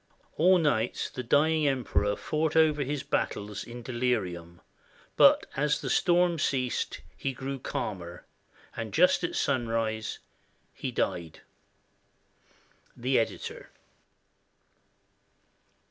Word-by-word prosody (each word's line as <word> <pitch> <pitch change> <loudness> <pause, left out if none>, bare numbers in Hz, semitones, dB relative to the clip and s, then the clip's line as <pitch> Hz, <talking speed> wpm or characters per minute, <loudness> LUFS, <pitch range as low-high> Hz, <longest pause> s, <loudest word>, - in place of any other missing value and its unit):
All 180 +4 +5
night 130 -9 0
the 130 - -4
dying 150 +5 +3
Emperor 120 -6 0
fought 155 +5 -1
over 155 -2 +4
his 140 0 -3
battles 105 0 -2
in 120 0 -9
delirium, 95 -9 -2 0.5
but - - +6
as 150 +1 +1
the - - -3
storm 175 -2 +3
ceased 130 -4 -1
he 135 - -3
grew 135 +1 -5
calmer, 90 -7 -5 0.5
and - - -5
just - - +4
at - - -2
sunrise 115 -3 -1 0.6
he - - -4
died. 85 -2 -3 1.6
The 130 +2 +2
Editor. 115 - -4
125 Hz, 100 wpm, -28 LUFS, 110-150 Hz, 1.6 s, but